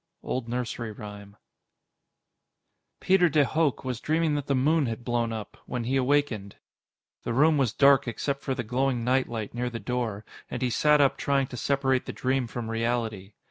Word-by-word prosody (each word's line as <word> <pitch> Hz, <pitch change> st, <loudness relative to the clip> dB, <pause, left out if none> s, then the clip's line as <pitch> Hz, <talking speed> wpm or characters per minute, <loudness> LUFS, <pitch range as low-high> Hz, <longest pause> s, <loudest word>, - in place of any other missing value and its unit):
_ -, -, -15 dB
Old 120 Hz, -2 st, -2 dB
Nursery 120 Hz, -2 st, -3 dB
Rhyme 105 Hz, -1 st, -10 dB, 1.6 s
Peter 185 Hz, -2 st, +4 dB
de 145 Hz, -1 st, +3 dB
Hooch 155 Hz, -1 st, 0 dB
was 125 Hz, -3 st, -3 dB
dreaming 160 Hz, +1 st, +1 dB
that 145 Hz, -1 st, -2 dB
the 140 Hz, -, +1 dB
moon 145 Hz, +2 st, +2 dB
had 115 Hz, +1 st, -5 dB
blown 120 Hz, -1 st, 0 dB
up 110 Hz, -2 st, -6 dB
when 125 Hz, -2 st, -3 dB
he 130 Hz, +4 st, -1 dB
awakened. 130 Hz, -7 st, +1 dB, 0.7 s
The 120 Hz, -, -3 dB
room 150 Hz, +4 st, +4 dB
was 130 Hz, -5 st, +2 dB
dark 140 Hz, +2 st, +5 dB
except 140 Hz, +4 st, -2 dB
for 135 Hz, -2 st, -2 dB
the 120 Hz, -, -3 dB
glowing 125 Hz, +1 st, 0 dB
night 130 Hz, +2 st, +1 dB
light 110 Hz, -3 st, -5 dB
near 120 Hz, +1 st, -2 dB
the 115 Hz, -1 st, -6 dB
door, 115 Hz, -5 st, -3 dB, 0.2 s
and 125 Hz, -, -4 dB
he 125 Hz, -, +1 dB
sat 150 Hz, +5 st, +4 dB
up 140 Hz, -, +3 dB
trying 140 Hz, -1 st, +1 dB
to 125 Hz, -, -7 dB
separate 135 Hz, +1 st, +1 dB
the -, -, -4 dB
dream 130 Hz, -1 st, 0 dB
from 115 Hz, -1 st, -5 dB
reality. 115 Hz, -4 st, -2 dB
125 Hz, 185 wpm, -27 LUFS, 115-140 Hz, 1.6 s, dark